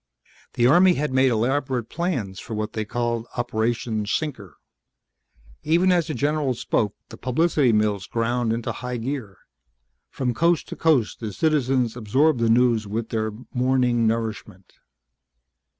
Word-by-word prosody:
The 120 - +2
Army 175 +7 +6
had 150 -2 -2
made 130 0 +4
elaborate 125 +1 0
plans 135 - -3
for 115 - -6
what 105 0 -3
they 110 -1 -3
called 120 +1 -2
"Operation 115 -2 -1
Sinker." 115 - -3 1.1
Even 170 +4 +3
as 175 -2 +2
the 155 - -3
general 145 0 0
spoke 105 -3 -1
the - - -10
publicity 145 0 +2
mills 105 -2 0
ground 120 0 0
into 115 0 -2
high 125 -1 -5
gear. 115 -5 -5 0.7
From 125 -2 -2
coast 170 +4 +1
to - - -6
coast 145 -9 +1
the 110 -3 -5
citizens 130 -4 +1
absorbed 130 +5 +2
the 115 -1 +2
news 115 -2 +3
with 110 +2 -3
their 110 -1 -1 0.2
morning 125 -2 +2
nourishment. 110 -4 -4
120 Hz, 140 wpm, -23 LUFS, 110-140 Hz, 1.1 s, Army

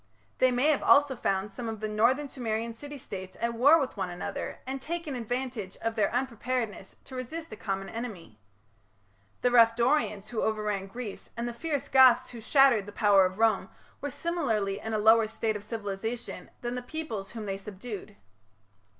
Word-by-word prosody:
They 255 - +5
may 250 +4 +2
have 295 - +1
also 285 -2 +5
found 195 -2 -1
some 230 +2 -5
of 220 -1 -5
the 215 - -2
northern 240 +7 +2
Sumerian 230 -3 -3
city 290 +5 -8
states 190 -8 -8
at 235 0 0
war 285 +8 +6
with 270 -3 -2
one 190 -2 -2
another 175 0 -5
and 265 +1 -4
taken 335 -1 -4
advantage 245 -4 -4
of 225 0 -1
their 220 -2 +2
unpreparedness 245 -4 -2
to 265 - -13
resist 310 +6 -6
a - - -6
common 195 -2 -3
enemy. 200 - -7 1.0
The 245 - +4
rough 230 -1 +6
Dorians 235 -5 +1
who 235 - -2
overran 210 -3 -1
Greece 225 0 -7
and 235 +1 -2
the 240 - -4
fierce 285 +1 -3
Goths 260 -2 +6
who 235 -2 -8
shattered 250 -5 +4
the - - -7
power 200 -2 +5
of 185 +1 -9
Rome 220 -4 +2 0.3
were 285 - -2
similarly 230 - -1
in 220 +1 -3
a - - +2
lower 220 +1 +5
state 220 0 -2
of 205 - -6
civilization 220 +2 -5
than 240 0 -3
the 250 - -3
peoples 245 -8 -5
whom 225 -2 -5
they 195 -1 -3
subdued. 205 - -8
230 Hz, 185 wpm, -29 LUFS, 210-255 Hz, 1.0 s, war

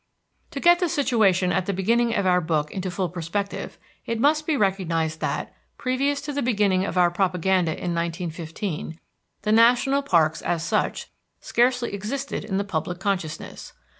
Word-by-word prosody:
To 280 - -5
get 345 +3 +5
the 355 -2 +1
situation 215 - +2
at 185 0 0
the 200 - 0
beginning 230 +5 +1
of 200 - 0
our 180 -1 +3
book 155 -2 -1
into 190 -1 -3
full 180 +1 -2
perspective, 180 +4 -4 0.3
it 230 -1 -3
must 300 +4 +2
be 310 -3 +1
recognized 170 -6 0
that, - - -3 0.2
previous 275 +2 0
to 295 0 -5
the 285 - -1
beginning 205 -6 +2
of 190 - -4
our 175 -1 +4
propaganda 180 -2 +1
in 175 +1 -3
1915, 170 0 -4 0.4
the 210 - 0
national 245 +5 +4
parks, 165 - +2
as 170 -2 -1
such, 170 - -1 0.3
scarcely 245 -1 +1
existed 255 +8 -4
in 190 - -2
the 200 - 0
public 175 -2 -3
consciousness. 180 -6 -4
195 Hz, 165 wpm, -24 LUFS, 175-240 Hz, 0.4 s, get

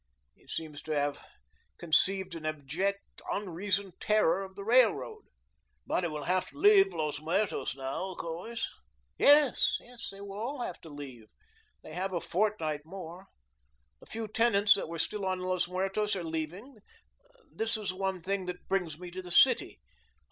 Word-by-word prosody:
He - - -27
seems 150 -2 -5
to 155 - -4
have 145 0 -1 0.5
conceived 185 +2 +2
an 165 -2 -7
abject, 155 +7 -3
unreasoned 195 0 -2
terror 195 -4 +3
of 190 0 -10
the 200 - -7
Railroad." 220 - +3 0.6
"But 180 - 0
he 170 - 0
will 150 -1 -5
have 185 +4 +1
to - - -17
leave 395 +3 +6
Los 150 -1 -2
Muertos 160 - 0
now, 135 +6 -3
of 185 - -8
course?" 175 +8 -4 0.5
"Yes, 290 -2 +6 0.3
they 195 - -11
will 200 0 -7
all 250 +4 -3
have 180 - -5
to 165 - -11
leave. 135 -6 -9 0.6
They - - -10
have 190 +1 -2
a 175 - +1
fortnight 165 -6 -1
more. 180 +2 -9 0.7
The - - -17
few 225 0 -4
tenants 210 -2 +5
that 195 - -3
were 165 - -5
still 210 +5 -1
on 185 -1 0
Los 185 -1 0
Muertos 195 +3 0
are 185 - -3
leaving. 165 - -5 0.8
That 225 0 +2
is 205 -4 -3
one 190 -2 -2
thing 195 0 -2
that 180 0 -6
brings 175 -6 -1
me 180 0 -9
to 185 +1 -6
the 180 - -10
city. 255 +9 +4
185 Hz, 165 wpm, -30 LUFS, 160-205 Hz, 0.8 s, leave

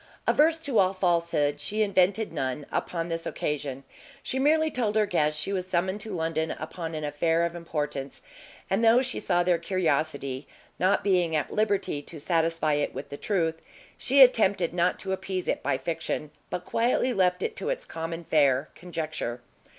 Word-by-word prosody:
Averse 320 +2 +4
to 275 -7 +1
all 185 0 +4
falsehood, 170 -5 +1
she 215 +1 0
invented 200 -1 +2
none 135 -1 -2
upon 165 -1 -2
this 165 -1 -4
occasion; 140 -2 -3 0.4
she 265 - -2
merely 315 +3 +3
told 220 -4 -1
her 215 -1 +4
guests 150 -5 0
she 195 +6 -3
was 185 -1 -2
summoned 185 +2 0
to 220 - -7
London 160 -1 -1
upon 165 0 -5
an 155 - -4
affair 165 +3 +1
of 170 - -3
importance; 150 -5 -4 0.4
and 230 - 0
though 230 +3 +6
she 255 - -2
saw 175 -2 +1
their 175 -1 +2
curiosity, 155 -6 -1 0.3
not 185 +2 +2
being 180 -5 +2
at 150 - -1
liberty 205 -8 0
to 155 +2 -9
satisfy 165 -1 +1
it 145 0 -1
with - - -6
the - - -6
truth, 165 -4 -1 0.3
she 270 +2 +6
attempted 200 -8 +3
not 175 +1 +1
to 190 - -4
appease 190 -1 -3
it - - 0
by - - 0
fiction, 160 -2 -3 0.2
but 180 - -4
quietly 245 +2 +1
left 180 -3 +2
it 455 - -2
to - - -3
its - - -2
common 165 +1 -5
fare, 140 -3 +2
conjecture. 155 -8 -4
170 Hz, 175 wpm, -27 LUFS, 155-200 Hz, 0.4 s, though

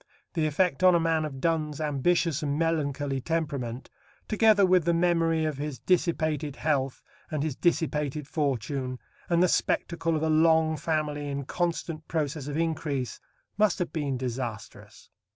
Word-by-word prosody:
The 160 -3 +1
effect 165 0 +1
on 185 -1 +7
a - - +4
man 165 -1 +1
of 135 -3 -6
Donne's 155 -1 0
ambitious 155 +2 +1
and 145 -1 -1
melancholy 145 -4 -1
temperament, 140 -6 -3 0.4
together 215 -2 +5
with 185 -2 +4
the 170 0 +3
memory 165 -2 +2
of 150 -3 -2
his 145 -2 -4
dissipated 155 -5 0
health 135 -4 -1 0.3
and 150 -2 -2
his 155 -4 -2
dissipated 150 -4 0
fortune, 135 -3 -2 0.3
and 170 0 +4
the - - +5
spectacle 165 -1 0
of 155 - -1
a - - +2
long 160 0 +4
family 150 -2 -2
in 140 -1 -3
constant 165 -1 -2
process 150 -3 -2
of 145 0 -3
increase, 155 -7 -2 0.4
must 210 -3 +3
have 180 - -3
been 145 -5 -1
disastrous. 120 -3 -6
155 Hz, 150 wpm, -27 LUFS, 140-165 Hz, 0.4 s, on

